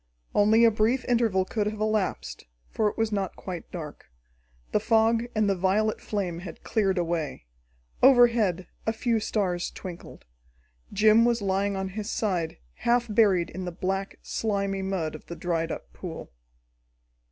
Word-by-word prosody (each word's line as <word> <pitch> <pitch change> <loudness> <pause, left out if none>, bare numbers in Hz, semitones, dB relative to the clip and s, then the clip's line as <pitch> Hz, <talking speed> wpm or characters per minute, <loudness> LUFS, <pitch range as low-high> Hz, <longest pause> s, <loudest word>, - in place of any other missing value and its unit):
Only 220 +3 +5
a 230 - +6
brief 225 +4 +1
interval 225 -6 +2
could 210 +1 -1
have 215 0 -4
elapsed, 215 - -1 0.3
for 215 - +1
it - - -10
was 225 -1 0
not 195 -3 -2
quite 180 -3 -7
dark. 155 - -8 0.6
The - - +2
fog 225 +1 +3
and 215 -1 +2
the 200 - +3
violet 195 +4 +1
flame 185 -5 -3
had 175 -1 -9
cleared 200 -4 +1
away. 165 - -2 0.6
Overhead 235 -8 +5 0.2
a 220 - +2
few 230 0 0
stars 185 -5 -1
twinkled. 180 -3 -10 0.7
Jim 215 +2 +5
was 240 0 +2
lying 195 +1 0
on 190 0 -3
his 210 +2 -5
side, 180 -9 -1 0.2
half 240 0 +2
buried 195 -6 +3
in 185 0 -5
the 180 - -3
black, 195 +2 -3
slimy 200 -3 -1
mud 190 -5 -2
of 155 - -11
the 170 - -6
dried 165 -1 -1
up - - -7
pool. - - -8
200 Hz, 155 wpm, -27 LUFS, 185-220 Hz, 0.7 s, a